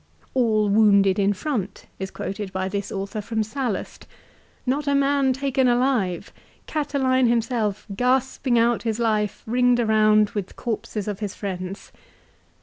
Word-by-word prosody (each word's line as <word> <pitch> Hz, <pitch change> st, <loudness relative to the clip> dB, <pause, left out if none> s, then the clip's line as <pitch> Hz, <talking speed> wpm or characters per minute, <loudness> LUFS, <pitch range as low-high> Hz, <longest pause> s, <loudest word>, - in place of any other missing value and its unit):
"All 220 Hz, -5 st, +2 dB
wounded 200 Hz, -2 st, +4 dB
in 200 Hz, 0 st, +3 dB
front," 205 Hz, -3 st, -4 dB
is 190 Hz, 0 st, -4 dB
quoted 195 Hz, 0 st, -5 dB
by 190 Hz, 0 st, -2 dB
this 200 Hz, 0 st, -4 dB
author 200 Hz, +2 st, -4 dB
from 220 Hz, +1 st, -1 dB
Sallust. 225 Hz, -1 st, -4 dB, 0.3 s
" -, -, -34 dB
Not 275 Hz, +3 st, -1 dB
a 280 Hz, -, +2 dB
man 280 Hz, -1 st, +2 dB
taken 265 Hz, 0 st, +1 dB
alive! 240 Hz, -8 st, 0 dB, 0.3 s
Catiline 265 Hz, -4 st, +1 dB
himself 230 Hz, -3 st, 0 dB
gasping 255 Hz, +1 st, +1 dB
out 235 Hz, 0 st, +3 dB
his 225 Hz, -2 st, -2 dB
life 215 Hz, -3 st, 0 dB
ringed 245 Hz, +1 st, +3 dB
around 215 Hz, -2 st, +4 dB
with 200 Hz, -3 st, -5 dB
corpses 215 Hz, -3 st, -4 dB
of 205 Hz, -2 st, -3 dB
his 205 Hz, -2 st, -4 dB
friends." 190 Hz, -1 st, -6 dB
220 Hz, 145 wpm, -23 LUFS, 200-255 Hz, 0.3 s, wounded